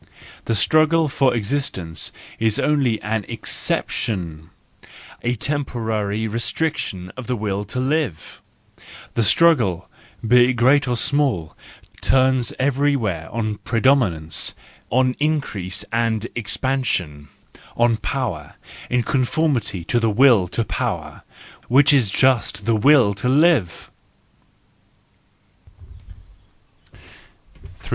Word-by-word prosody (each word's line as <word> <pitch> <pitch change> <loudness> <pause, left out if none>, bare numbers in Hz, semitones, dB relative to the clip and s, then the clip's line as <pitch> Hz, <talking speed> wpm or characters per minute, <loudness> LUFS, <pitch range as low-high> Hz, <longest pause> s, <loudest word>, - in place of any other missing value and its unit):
The 115 - 0
struggle 155 +7 +3
for 135 -2 +1
existence 100 - -3 0.3
is 110 -1 +1
only 135 -7 +1
an 110 +1 -2
exception, 80 -7 -3 0.7
a 120 +1 -1
temporary 110 -6 -2
restriction 115 - -3
of 130 -2 -8
the 125 - -1
will 105 -2 -3
to 120 +5 -5
live; 130 - -2 0.7
the 115 - 0
struggle, 115 - +3 0.4
be 125 +1 +6
it 125 - +1
great 130 +4 +3
or 120 -1 0
small, 130 - 0 0.5
turns 130 -2 +2
every¬ 140 +1 +1
where 90 -9 -3
on 110 -2 -3
predominance, 115 - +1 0.3
on 130 +1 +2
increase 105 - -2
and 115 -1 0
expansion, 110 - -2 0.5
on 120 -1 +3
power, 110 - -4 0.3
in 125 -1 +1
conformity 130 - -1
to 120 +8 0
the 115 -1 +1
will 110 -4 +4
to 115 +6 -2
power, - - -4 0.5
which 135 +4 +5
is 125 -7 +3
just 115 -3 +1
the 115 0 +2
will 120 -2 +4
to 105 +5 -3
live. 140 - +2
120 Hz, 105 wpm, -21 LUFS, 100-135 Hz, 0.7 s, be